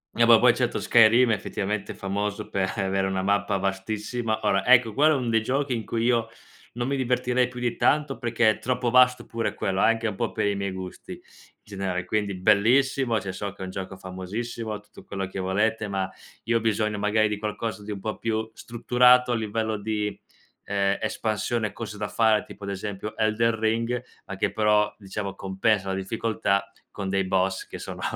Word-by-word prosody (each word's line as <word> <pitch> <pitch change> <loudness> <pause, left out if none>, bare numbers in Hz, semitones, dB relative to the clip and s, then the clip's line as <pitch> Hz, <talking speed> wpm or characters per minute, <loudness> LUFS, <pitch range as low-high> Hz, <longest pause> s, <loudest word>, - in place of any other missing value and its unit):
Eh, 120 - +4
po 115 -1 +9
poi 120 +1 +5
certo, 125 -2 0
Skyrim 115 +1 +5
effettivamente 105 -1 -3
famoso 100 +1 -3
per 95 -1 -1
avere 95 -1 0
una 95 -1 -1
mappa 100 0 +1
vastissima 110 +4 -2
ora, 95 -1 +2
ecco 120 -2 +5
quello 150 +6 +4
è - - +1
un 120 -3 -2
dei 115 - +3
giochi 135 +3 -1
in 115 -2 -2
cui 115 -1 -2
io 120 -2 +2 0.5
non 120 +1 -3
mi 140 - 0
divertirei 125 0 +1
più 125 -1 -9
di 120 -1 -1
tanto, 145 -1 +1
perché 115 -2 +2
è - - -6
troppo 125 -1 -1
vasto 125 -1 +5
pure 115 -1 -3
quello 95 0 -1
anche 115 0 +2
un 105 - -3
po' 115 +3 -2
per 110 -1 -1
i 100 - +1
miei 100 0 -2
gusti 95 -1 -8
in - - -12 0.4
generale, 95 -3 -3
quindi 100 0 -1
bellissimo, 115 +5 +3
cioè 95 -1 -5
so 100 0 -5
che 100 - -9
è - - -3
un 95 - -7
gioco 95 0 -6
famosissimo 105 +4 -5
tutto - - -16
quello 95 -1 -4
che 95 - -6
volete, 105 +4 0
ma 95 -1 -1 0.4
io 115 +1 +2
ho - - -2
bisogno 105 -1 0
magari 110 +1 +2
di 105 -1 -3
qualcosa 105 0 -4
di 105 - -6
un 100 - -5
po' 110 +2 -4
più 110 0 -2
strutturato 125 +2 +3
a - - +2
livello 110 0 -2
di, 105 0 -2 0.5
ehm, 100 -1 +1
espansione, 110 0 -1
cose 105 -2 -7
da 105 - -3
fare, 110 0 +2
tipo 100 - -11
ad 100 - -5
esempio 100 +1 -5
Elden 110 +1 +1
Ring, 115 +2 0 0.3
a 100 - -6
che - - 0
però 105 -1 +2
diciamo 100 -1 -5
compensa 100 +1 0
la 95 - -1
difficoltà 100 0 -1 0.2
con 100 -2 -5
dei 95 0 +1
boss 95 0 0
che - - -9
sono - - -7
110 Hz, 200 wpm, -25 LUFS, 100-115 Hz, 0.5 s, po